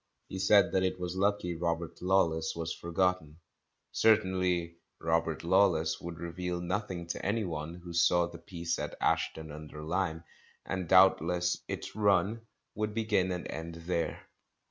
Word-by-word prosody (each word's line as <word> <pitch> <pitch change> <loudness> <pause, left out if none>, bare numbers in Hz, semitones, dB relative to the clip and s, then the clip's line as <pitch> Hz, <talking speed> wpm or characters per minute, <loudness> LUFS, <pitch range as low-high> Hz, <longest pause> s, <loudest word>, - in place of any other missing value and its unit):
He 95 - -5
said 100 +1 +5
that 95 - +2
it 95 0 -1
was 90 0 -3
lucky 100 -2 +1
"Robert 85 0 -3
Lawless" 85 -4 +2
was 80 -1 -3
forgotten; 85 -3 -1 0.5
certainly 90 -5 +2 0.2
"Robert 80 0 0
Lawless" 85 -3 +3
would 85 -1 -6
reveal 90 +1 -4
nothing 90 -1 -3
to - - -4
any 110 +3 0
one 80 -2 -4
who 85 -1 -9
saw 85 +1 +4
the 85 0 -9
piece 85 -1 -4
at - - -5
Ashton 80 -1 0
under 75 0 -9
Lyne, 80 0 -1 0.4
and 95 -2 -3
doubtless 90 -2 +4
its - - -5
"run" 105 +1 +2 0.3
would 105 0 -3
begin 105 -5 +1
and 90 -1 -3
end 80 0 -6
there. 85 0 -2
90 Hz, 145 wpm, -31 LUFS, 85-95 Hz, 0.5 s, said